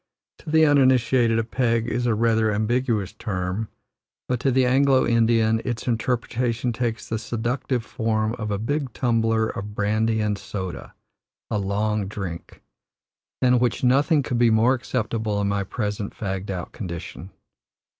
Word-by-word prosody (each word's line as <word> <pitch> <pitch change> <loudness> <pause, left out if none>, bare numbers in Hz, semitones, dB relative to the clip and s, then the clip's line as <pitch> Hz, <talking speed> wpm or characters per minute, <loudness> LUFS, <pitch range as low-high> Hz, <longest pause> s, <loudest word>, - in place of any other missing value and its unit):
To - - -10
the 160 0 +5
uninitiated 130 -4 +4
a 115 - +1
"peg" 115 -1 0
is 120 +1 -1
a 115 - +2
rather 110 -1 +2
ambiguous 110 -1 0
term, 95 +1 -3 0.6
but 125 -2 -1
to 135 - +1
the 130 0 +3
Anglo 135 +1 +4
Indian 115 -1 +3
its 120 -1 -4
interpretation 120 0 -1
takes 115 -1 -3
the 110 - -2
seductive 120 +1 -2
form 110 -1 -1
of 110 -1 -3
a 100 - -1
big 135 +3 -2
tumbler 115 -2 +1
of 105 +1 -6
brandy 110 +2 +1
and 105 -2 -1
soda, 95 -3 -6 0.6
a 105 - +1
"long 100 +1 -1
drink," 95 -4 -7 0.8
than 125 -1 +4
which 125 +1 0
nothing 140 +4 +3
could 125 -1 -2
be 120 -1 +5
more 115 +3 +4
acceptable 110 -4 -2
in 100 - 0
my 100 0 0
present 105 0 -4
fagged 95 -1 -4
out 90 -3 -4
condition. 90 -1 -7
115 Hz, 150 wpm, -24 LUFS, 105-125 Hz, 0.8 s, the